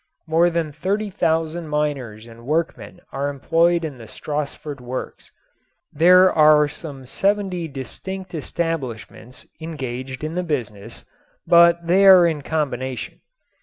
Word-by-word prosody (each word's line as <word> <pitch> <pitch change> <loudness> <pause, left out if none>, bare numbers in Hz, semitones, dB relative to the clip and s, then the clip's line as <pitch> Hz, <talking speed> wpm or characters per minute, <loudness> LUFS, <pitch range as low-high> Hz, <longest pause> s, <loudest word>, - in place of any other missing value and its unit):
More 165 +2 +3
than 165 -3 -2
thirty 195 +7 -2
thousand 165 -1 -1
miners 140 -8 -3
and 115 0 -14
workmen 165 +3 -3
are 140 +1 -2
employed 165 +4 +1
in 140 -5 -7
the 115 - -11
Stassfurt 145 0 -5
works. 125 +1 -7 0.6
There 180 +4 +6
are 150 -1 +5
some 145 -3 -9
seventy 195 +2 -1
distinct 180 +7 -7
establishments 130 -7 -5 0.2
engaged 130 -4 -6
in 155 +1 -3
the 180 - -1
business, 115 - -5 0.4
but 170 0 +5
they 190 +4 +4
are 185 -2 +8
in 160 -3 0
combination. 130 -6 -4
155 Hz, 125 wpm, -21 LUFS, 130-170 Hz, 0.6 s, are